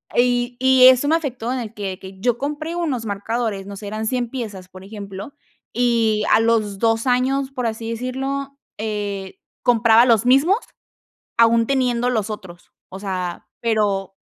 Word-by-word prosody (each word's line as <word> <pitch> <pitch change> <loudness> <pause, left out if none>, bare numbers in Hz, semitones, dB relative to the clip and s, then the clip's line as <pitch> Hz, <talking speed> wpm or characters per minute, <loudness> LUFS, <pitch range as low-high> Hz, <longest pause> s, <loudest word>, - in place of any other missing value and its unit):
y 245 0 +2
y 260 0 +7
eso 260 +2 +5
me 320 - +4
afectó 255 -7 -3
en 260 - -2
el 225 -3 -6
que 195 -4 -5
que 190 0 -11
yo 240 +1 +1
compré 300 +5 -4
unos 290 -10 -2
marcadores. 210 0 -3
No 200 - -7
sé, 205 +1 -8
eran 215 +2 -4
100 245 -1 -1
piezas, 210 -8 -6
por 185 0 -12
ejemplo, 200 +3 -8 0.4
y 230 -3 +2
a - - +6
los 220 -3 +1
2, 225 +1 +1
años, 265 +2 +1
por 250 -2 -3
así 225 0 -4
decirlo, 270 +3 -4 0.2
eh, 205 -3 -4 0.2
compraba 230 0 +5
los 230 -2 +3
mismos, 280 - +4 0.8
aun 230 0 +5
teniendo 250 -2 +1
los 220 -3 -1
otros. 190 -5 -9 0.2
O 190 - -8
sea, 185 -3 -4
pero 205 -4 0
230 Hz, 165 wpm, -21 LUFS, 205-255 Hz, 0.8 s, y